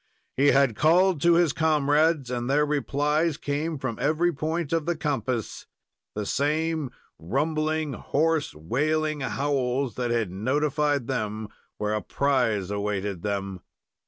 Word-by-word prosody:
He 140 +2 +3
had 135 -5 +4
called 175 - +3
to 170 +2 +5
his 170 -4 +3
comrades, 155 -2 +2
and 120 0 -2
their 145 +2 +3
replies 150 +2 0
came 150 +3 -2
from 130 -4 -4
every 160 +5 +2
point 160 +2 -2
of 165 -1 0
the 175 - +1
compass 130 -7 -3 0.5
the 105 0 -3
same 155 +3 0 0.3
rumbling, 155 - -1
hoarse, 155 - 0
wailing 155 - -1
howls 135 -2 -1
that 125 -1 -1
had 115 -5 0
notified 145 +6 0
them 110 -4 -3 0.3
where 105 0 -1
a 105 - -1
prize 120 -9 0
awaited 100 -2 -2
them. 100 -2 -3
140 Hz, 130 wpm, -26 LUFS, 120-155 Hz, 0.5 s, to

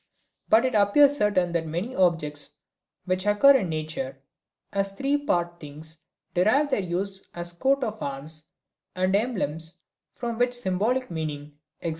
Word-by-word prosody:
But 225 +3 +5
it 255 - 0
appears 225 +8 +5
certain 205 -7 +2
that 165 -1 -1
many 180 +11 -3
objects 150 -5 +1 0.5
which 185 +2 -1
occur 275 +7 +7
in 190 -9 -2
nature 155 -4 -4 0.5
as 195 0 +1
three 275 +8 0
part 175 -12 -1
things 155 +2 -8 0.3
derive 245 +11 +3
their 210 - +2
use 190 +2 -3
as 175 0 -4
coats 270 +9 +1
of 220 -2 -4
arms 150 +3 -5 0.5
and 185 +1 +2
emblems 175 - -1 0.4
from 235 -2 -4
such 245 0 +2
symbolic 245 +2 0
meaning, 150 -2 -5 0.2
e.g. 170 - 0
185 Hz, 145 wpm, -26 LUFS, 160-230 Hz, 0.5 s, occur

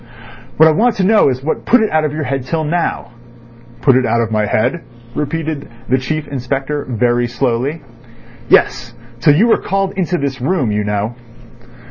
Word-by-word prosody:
"What 160 - +7
I - - +5
want 225 +9 +2
to 195 - 0
know 210 -4 +4
is 130 0 -3
what 155 - -2
put 250 - +4
it 220 - 0
out 155 0 +2
of 155 - -1
your 155 +1 -3
head 135 -1 -2
till 160 +3 -1
now." 160 -6 -2 0.7
"Put 135 -3 +4
it 130 - +3
out 115 -1 +1
of 115 -1 -1
my 105 -1 +1
head," 165 +12 0 0.3
repeated 150 +1 -3 0.2
the 130 +1 +3
Chief 155 +3 -3
Inspector 135 +2 -3
very 120 +1 +1
slowly. 125 +5 -2 0.7
"Yes. 120 -2 +2 0.2
Till 145 +1 +4
you 200 +9 +4
were 235 - +3
called 195 -1 -1
into 180 -2 -1
this 140 -4 -3
room—you 125 - 0
know." 105 +2 -2
140 Hz, 180 wpm, -16 LUFS, 120-160 Hz, 0.7 s, What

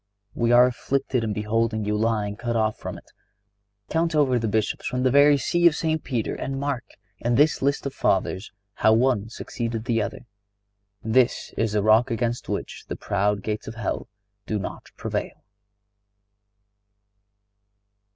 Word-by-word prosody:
We 120 0 +1
are 120 +1 +8
afflicted 130 0 -1
in 110 - -1
beholding 110 +1 0
you 105 0 0
lying 105 -2 0
cut 120 +2 -3
off 110 -1 +1
from - - -7
it. - - -17 0.8
Count 165 0 0
over 135 -5 +3
the 115 - -1
Bishops 110 0 -1
from 125 0 -1
the 130 - +3
very 145 +1 +6
See 175 +5 +3
of 165 - +3
St. 160 -1 -1
Peter, 120 -5 -2
and 135 0 -4
mark, 140 -4 -2 0.4
in 120 +1 0
this 150 +4 +3
list 140 +1 0
of 140 - -3
Fathers, 95 +2 0 0.2
how 110 - +4
one 115 -2 +2
succeeded 115 -1 -4
the 115 -2 +1
other. - - -5 0.8
This 120 +3 +1
is 110 -2 0
the 105 -1 +1
rock 110 +4 +5
against 120 0 -2
which - - -4
the - - -4
proud 100 0 0
gates 105 -1 -3
of 110 - -6
hell 115 -4 -3 0.4
do 110 - -1
not 100 - -6
prevail." - - -4
115 Hz, 160 wpm, -24 LUFS, 110-130 Hz, 0.8 s, are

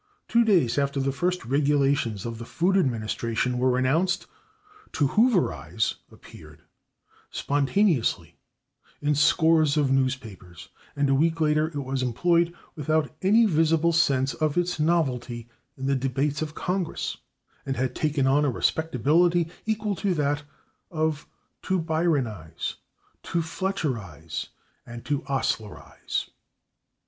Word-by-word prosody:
Two 235 0 +4
days 170 - +3
after 140 0 0
the 135 0 0
first 180 +6 -1
regulations 140 -5 +1
of 115 -1 -5
the 115 - -7
Food 180 +9 0
Administration 120 - 0
were 125 0 +2
announced, 165 +8 +1 0.7
/to 145 - +2
hooverize/ 210 - +1 0.2
appeared - - -15 0.7
spontaneously 145 - +1 0.6
in 150 0 +1
scores 155 0 +3
of 140 -3 +2
newspapers, 115 -10 -2 0.3
and 145 0 +1
a 135 - +3
week 165 +4 +2
later 155 0 +2
it 160 - -11
was 130 0 -2
employed 170 +8 +2 0.2
without 155 0 0
any 215 +5 +5
visible 165 -2 +2
sense 135 -5 +2
of 155 0 -1
its 175 -1 0
novelty 125 -8 0 0.3
in 135 - -5
the 140 0 +2
debates 135 +3 -1
of 155 -1 -4
Congress 180 -2 -2 0.5
and 135 -1 -3
had 130 0 -1
taken 150 -2 0
on 140 +3 +3
a 145 - +2
respectability 160 +6 +1 0.2
equal 215 -2 -1
to 190 0 0
that 145 -1 0 0.5
of 155 -2 -2 0.3
/to 190 - 0
bryanize/, 150 - -1 0.5
/to 170 - -1
fletcherize/ 130 - -4 0.4
and 120 0 -9
/to 145 -1 -1
oslerize 125 -6 -3
145 Hz, 125 wpm, -26 LUFS, 130-165 Hz, 0.7 s, any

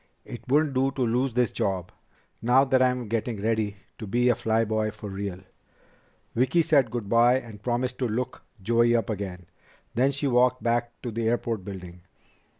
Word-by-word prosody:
"It 120 - -8
wouldn't 145 +2 +2
do 135 +1 +2
to 135 -1 -5
lose 125 +3 +1
this 125 -1 +2
job, 95 -3 -2 0.5
now 125 +3 +5
that 130 -1 +3
I'm 125 -2 +1
getting 115 0 -2
ready 110 -1 -1 0.2
to 110 - -6
be 120 +4 +2
a 120 - +4
fly 110 +1 +1
boy 110 0 0
for 105 -1 -8
real." 95 -1 -5 0.9
Vicki 130 +8 +2
said 140 -6 +3
good 120 -3 -4
by 120 +3 +5
and 110 -5 -12
promised 125 +2 -2
to 125 - +1
look 125 +3 -3 0.2
Joey 120 +2 +3
up 115 -2 0
again. 95 -3 -5 0.5
Then 130 +4 +2
she 140 +1 -3
walked 125 0 +3
back 120 0 -1
to 120 - -3
the 115 0 -1
airport 115 -3 -1
building. 90 -3 -9
120 Hz, 180 wpm, -26 LUFS, 110-125 Hz, 0.9 s, now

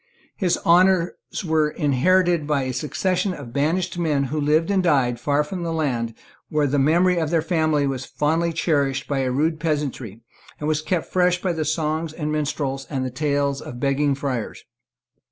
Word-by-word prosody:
His 180 -4 +1
honours 180 0 +4 0.3
were 155 -2 +2
inherited 170 +3 +2
by 145 -3 +1
a 130 0 -3
succession 180 +8 -1
of 125 -6 -10
banished 165 +6 0
men 150 -5 +1
who 155 - 0
lived 155 +5 +2
and 195 -1 +3
died 135 -8 +2
far 145 +2 +1
from 175 +4 -6
the 170 -1 -2
land 125 -8 -1 0.3
where 150 -1 +1
the 140 +1 +1
memory 175 +5 +3
of 160 -2 -1
their 165 -1 +1
family 155 -3 +1
was 135 -2 -2
fondly 165 +3 0
cherished 140 -5 0
by 140 -2 -1
a 130 -1 0
rude 155 +5 0
peasantry, 140 - -3 0.4
and 150 - -3
was 155 -1 +1
kept 165 +1 -1
fresh 180 -1 +3
by 180 -1 -1
the 160 -2 -2
songs 155 +1 -1
of 155 -2 -4
minstrels 145 -3 -2
and 135 -3 -2
the 130 - -4
tales 140 0 0
of 120 - -8
begging 140 +1 +1
friars. 135 -5 -4
150 Hz, 180 wpm, -22 LUFS, 140-170 Hz, 0.4 s, honours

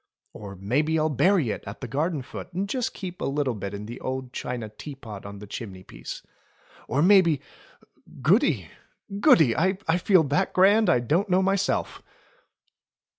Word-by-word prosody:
Or 100 -2 -9
maybe 140 - 0
I'll 155 0 +1
bury 160 - +2
it - - -5
at 100 - -7
the 130 - -6
garden 150 +4 -1
foot 150 - -9
and 190 +3 -2
just 250 +3 -2
keep 180 -2 -7
a - - -1 0.2
bit 100 -1 -5
in 100 +1 -7
the 120 +4 -8
old 130 -1 -5
china 120 -3 -4
teapot 110 -3 -9
on 100 0 -9
the 105 - -9
chimney 100 -3 -8
piece. - - -9 0.6
Or 145 +3 +1
maybe 180 -6 +5 0.4
— - - -19
Goody! 205 - +2 0.5
Goody! 155 - +5
I 185 +4 +2 0.3
feel 185 -2 +4
that 145 0 0
grand 205 +4 +5
I 125 - +3
don't 170 - 0
know 185 +1 +3
myself." 195 +1 0
145 Hz, 165 wpm, -25 LUFS, 115-185 Hz, 0.6 s, maybe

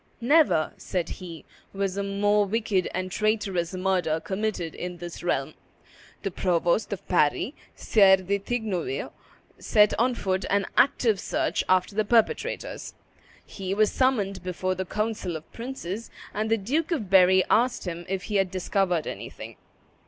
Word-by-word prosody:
"Never," 255 - +3
said 175 -3 -3
he, 170 -3 -9 0.3
"was 195 -1 -2
a 200 - -1
more 205 +1 +2
wicked 210 -3 0
and 185 +1 -3
traitorous 195 -4 0
murder 180 -4 0
committed 190 -3 -3
in 180 0 -6
this 175 0 -8
realm." - - -1 0.7
The 195 - -2
provost 175 +4 +1
of 200 - -5
Paris, 175 - +2 0.2
Sire 195 -4 +5
de 195 +2 -1
Tignouville, 200 - -3 0.5
set 210 -1 +4
on 245 +1 +2
foot 190 -3 -1
an 200 0 +2
active 230 -7 +3
search - - -1
after 185 +1 +3
the 215 +1 +1
perpetrators. 230 - 0 0.5
He 195 -1 -4
was 215 0 +3
summoned 205 -8 +1
before 185 +1 -2
the 190 0 -4
council 210 -3 -2
of 160 0 -9
princes, 230 -4 -6 0.2
and 215 +1 -1
the 225 - +3
Duke 275 +11 -1
of 220 - -2
Berry 185 0 +6
asked 240 0 +2
him 175 -1 -5
if 190 0 -2
he 205 -1 -1
had 195 -1 +2
discovered 185 -2 0
anything. - - -7
195 Hz, 150 wpm, -26 LUFS, 180-215 Hz, 0.7 s, Berry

